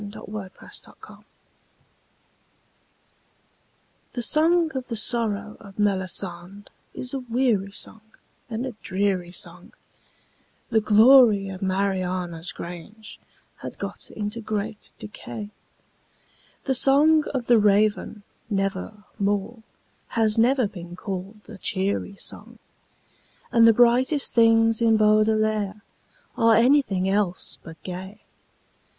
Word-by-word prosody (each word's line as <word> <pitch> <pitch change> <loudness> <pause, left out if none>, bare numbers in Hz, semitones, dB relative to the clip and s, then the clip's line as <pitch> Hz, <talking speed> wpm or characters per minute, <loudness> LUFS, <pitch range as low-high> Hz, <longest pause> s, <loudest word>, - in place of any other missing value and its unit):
The 205 0 -9
Song 205 -2 -7
Against - - -7
Songs - - -15 2.9
The 245 - -3
song 325 +4 +3
of 260 -1 -5
the 230 - -4
sorrow 215 -2 0
of 200 -2 -14
Melisande 190 -1 -2 0.2
is 250 +1 -4
a 270 - -2
weary 235 -5 0
song 215 +2 -6 0.5
and 230 +2 -3
a 260 - -4
dreary 190 -2 -1
song, 175 0 -5 1.0
The 220 -1 +3
glory 215 -2 +6
of 185 -1 -8
Mariana's 185 -3 -2
grange 180 +6 -9 0.4
had - - -9
got - - -6
into 210 +2 -5
great 210 -1 -4
decay, 210 0 -8 1.1
The 270 - 0
song 295 +4 +5
of 250 -2 -2
the 240 -1 +5
Raven 210 0 +1 0.3
Never 195 +1 -3 0.2
More 205 +3 -1 0.6
has 220 -2 +3
never 245 +1 +3
been 175 -3 -10
called 195 +2 -7
a 215 -3 -11
cheery 200 +1 -2
song, - - -7 0.9
And 230 -2 +6
the - - +8
brightest 245 +5 +3
things 225 -1 +4
in 225 -1 +4
Baudelaire 215 -1 +2 0.5
are 230 -1 +4
anything 230 -6 +3
else 195 -2 -1
but 165 0 -12
gay. 190 +3 -8
210 Hz, 110 wpm, -24 LUFS, 195-230 Hz, 2.9 s, the